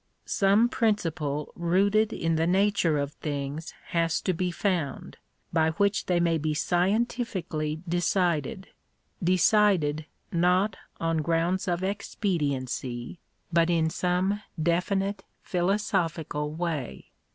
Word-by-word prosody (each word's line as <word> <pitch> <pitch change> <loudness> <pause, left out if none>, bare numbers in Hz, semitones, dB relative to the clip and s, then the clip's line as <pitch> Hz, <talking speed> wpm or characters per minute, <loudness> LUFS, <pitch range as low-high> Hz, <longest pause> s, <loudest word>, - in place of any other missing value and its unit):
Some 200 +3 +3
principle 160 -11 -1
rooted 200 +5 +2
in 165 0 0
the 160 +1 +1
nature 190 -4 +2
of 140 0 -1
things 145 +1 -5
has 165 -1 +1
to 185 - 0
be 180 +2 -1
found, 175 -6 -2 0.4
by 160 -1 +3
which 200 +4 +1
they 180 -2 +2
may 170 -1 +2
be 155 0 -1
scientifically 180 -4 -1
decided 175 +3 0 0.3
— - - -45
deoided, 180 -4 +3 0.3
not 180 +4 +2 0.2
on 165 0 0
grounds 170 +5 0
of 175 0 0
expediency, 145 - -2 0.3
but 165 0 +4
in 160 -2 +2
some 185 +4 0 0.2
definite, 190 +4 0 0.2
philosophical 175 -5 -1
way. 155 - -4
175 Hz, 110 wpm, -27 LUFS, 160-195 Hz, 0.4 s, but